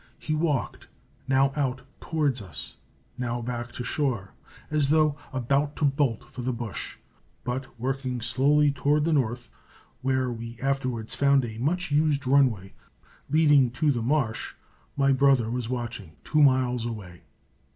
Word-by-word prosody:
He 155 Hz, -, -3 dB
walked, 155 Hz, -4 st, -1 dB, 0.4 s
now 135 Hz, 0 st, +3 dB
out 135 Hz, -3 st, -1 dB, 0.2 s
toward 145 Hz, -7 st, 0 dB
us, 90 Hz, -6 st, -7 dB, 0.4 s
now 120 Hz, -1 st, -2 dB
back 120 Hz, 0 st, -4 dB
to 125 Hz, -, -5 dB
shore, 120 Hz, -9 st, -2 dB, 0.4 s
as 150 Hz, -3 st, +2 dB
though 155 Hz, -1 st, +3 dB, 0.2 s
about 140 Hz, +3 st, 0 dB
to 150 Hz, -, 0 dB
bolt 135 Hz, -4 st, +1 dB
for 130 Hz, 0 st, -9 dB
the 130 Hz, +1 st, -1 dB
bush, 120 Hz, -4 st, -5 dB, 0.5 s
but 125 Hz, 0 st, -5 dB
working 130 Hz, 0 st, -2 dB
slowly 140 Hz, +6 st, +3 dB
toward 145 Hz, +2 st, +1 dB
the 165 Hz, +1 st, +1 dB
north, 120 Hz, -3 st, -1 dB, 0.5 s
where 130 Hz, -1 st, 0 dB
we 115 Hz, 0 st, -7 dB
afterwards 130 Hz, -4 st, -2 dB
found 140 Hz, -2 st, +3 dB
a 110 Hz, -1 st, -7 dB
much 165 Hz, +6 st, -1 dB
used 145 Hz, -1 st, +2 dB
runway, 125 Hz, -8 st, +2 dB, 0.6 s
leading 145 Hz, -4 st, +5 dB
to 145 Hz, +4 st, +2 dB
the 120 Hz, -4 st, -1 dB
marsh 125 Hz, -2 st, -1 dB, 0.4 s
my 140 Hz, -1 st, +4 dB
brother 135 Hz, -4 st, +3 dB
was 120 Hz, -2 st, -3 dB
watching, 120 Hz, -9 st, -5 dB
two 155 Hz, -, +2 dB
miles 130 Hz, -3 st, +3 dB
away. 100 Hz, -7 st, -7 dB
130 Hz, 145 wpm, -26 LUFS, 120-145 Hz, 0.6 s, leading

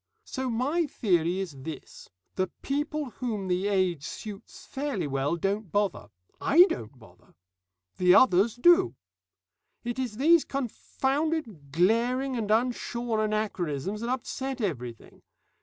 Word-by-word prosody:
So 260 Hz, -1 st, -3 dB
my 285 Hz, +8 st, 0 dB
theory 180 Hz, -, +1 dB
is 190 Hz, -3 st, -3 dB
this: 155 Hz, 0 st, -9 dB, 0.2 s
the 185 Hz, 0 st, 0 dB, 0.2 s
people 295 Hz, -1 st, -2 dB
whom 220 Hz, -7 st, -3 dB
the 185 Hz, +2 st, 0 dB
age 185 Hz, -7 st, +1 dB
suits 205 Hz, +4 st, -8 dB
fairly 270 Hz, -, -3 dB
well 140 Hz, +3 st, 0 dB
don't 195 Hz, +1 st, -2 dB
bother 205 Hz, 0 st, 0 dB, 0.3 s
I 335 Hz, +5 st, +7 dB
don't 115 Hz, +5 st, -5 dB
bother; 100 Hz, -7 st, -19 dB, 0.6 s
the 180 Hz, 0 st, +5 dB
others 210 Hz, -2 st, +5 dB
do. 350 Hz, +9 st, +5 dB, 0.9 s
It 240 Hz, +1 st, -3 dB
is 240 Hz, -5 st, -3 dB
these 325 Hz, +4 st, +5 dB
confounded 270 Hz, -, -2 dB
glaring 235 Hz, -, +2 dB
and 220 Hz, -3 st, -2 dB
unshorn 235 Hz, 0 st, 0 dB
anachronisms 210 Hz, -4 st, -2 dB
that 235 Hz, -, -3 dB
upset 265 Hz, +1 st, -3 dB
everything. 125 Hz, -, -5 dB
215 Hz, 125 wpm, -28 LUFS, 180-260 Hz, 0.9 s, I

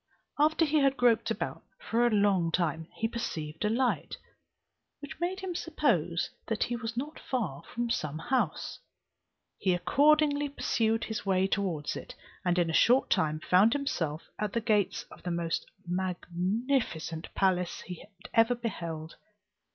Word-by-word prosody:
After 315 Hz, +2 st, +4 dB
he 305 Hz, 0 st, +2 dB
had 275 Hz, -1 st, +3 dB
groped 240 Hz, -2 st, +3 dB
about -, -, -3 dB, 0.2 s
for 240 Hz, -, +1 dB
a -, -, +3 dB
long 200 Hz, -6 st, +3 dB
time, 160 Hz, -2 st, 0 dB
he 225 Hz, -, 0 dB
perceived 165 Hz, -10 st, -4 dB
a 210 Hz, -, +2 dB
light, 245 Hz, +3 st, 0 dB, 0.8 s
which 285 Hz, 0 st, -9 dB
made 365 Hz, +3 st, -2 dB
him 380 Hz, -2 st, -3 dB
suppose 230 Hz, -, 0 dB, 0.2 s
that 225 Hz, -3 st, 0 dB
he 240 Hz, -, -2 dB
was 230 Hz, -1 st, -5 dB
not 295 Hz, +5 st, -4 dB
far 200 Hz, -, -2 dB
from 235 Hz, -1 st, -2 dB
some 155 Hz, -9 st, -1 dB
house: 245 Hz, +10 st, -1 dB, 0.8 s
he 185 Hz, -2 st, +2 dB
accordingly 290 Hz, -, +3 dB
pursued 225 Hz, -5 st, 0 dB
his 220 Hz, -, -4 dB
way 190 Hz, -1 st, +2 dB
towards 185 Hz, -7 st, -1 dB
it, -, -, -8 dB, 0.3 s
and 180 Hz, -1 st, +1 dB
in 170 Hz, -2 st, +2 dB
a -, -, -5 dB
short 250 Hz, +8 st, +4 dB
time 155 Hz, 0 st, +2 dB
found 195 Hz, +8 st, +5 dB
himself 165 Hz, -, -2 dB, 0.2 s
at 210 Hz, -2 st, -2 dB
the 235 Hz, -, +2 dB
gates 215 Hz, -3 st, +1 dB
of -, -, -13 dB
the 180 Hz, -, -4 dB
most 170 Hz, -1 st, -1 dB, 0.2 s
magnificent 180 Hz, -, -1 dB
palace 180 Hz, -2 st, +1 dB
he 180 Hz, -2 st, -8 dB, 0.3 s
ever 225 Hz, +2 st, +5 dB
beheld. 170 Hz, -9 st, -5 dB
210 Hz, 150 wpm, -30 LUFS, 170-255 Hz, 0.8 s, found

